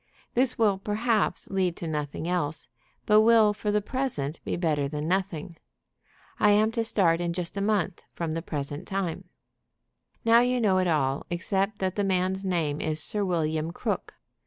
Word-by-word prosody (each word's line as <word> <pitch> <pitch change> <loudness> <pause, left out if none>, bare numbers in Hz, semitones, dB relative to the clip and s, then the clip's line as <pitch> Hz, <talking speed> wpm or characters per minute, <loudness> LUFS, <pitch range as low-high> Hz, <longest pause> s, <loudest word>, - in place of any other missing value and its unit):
This 250 +1 +3
will, 205 -4 +3
perhaps, 215 +2 0
lead 185 -3 +1
to 170 - -5
nothing 150 +1 -3
else, 165 -4 -1 0.4
but 210 0 +6
will 220 -2 +5
for 210 0 -3
the 210 0 +1
present 200 - -2
be - - -2
better 155 -5 0
than 150 +1 -4
nothing. 180 -3 -2 0.8
I 210 - +5
am 215 +2 +4
to 230 0 -1
start 175 -7 +2
in 170 -1 -1
just 175 0 -4
a 200 - -2
month 200 -4 0
from 165 -2 -2
the 165 - -2
present 145 -3 -5
time. 190 -2 -3 1.0
"Now 230 +1 +7
you 250 +1 +2
know 195 -5 +3
it 185 - +1
all 140 -4 0
except 195 +4 -1
that 185 -1 -1
the 205 - +2
man's 190 0 0
name 165 -6 -1
is 155 0 -1
Sir 205 +7 -2
William 160 -3 0
Crook. - - -3
185 Hz, 175 wpm, -27 LUFS, 160-210 Hz, 1.0 s, Now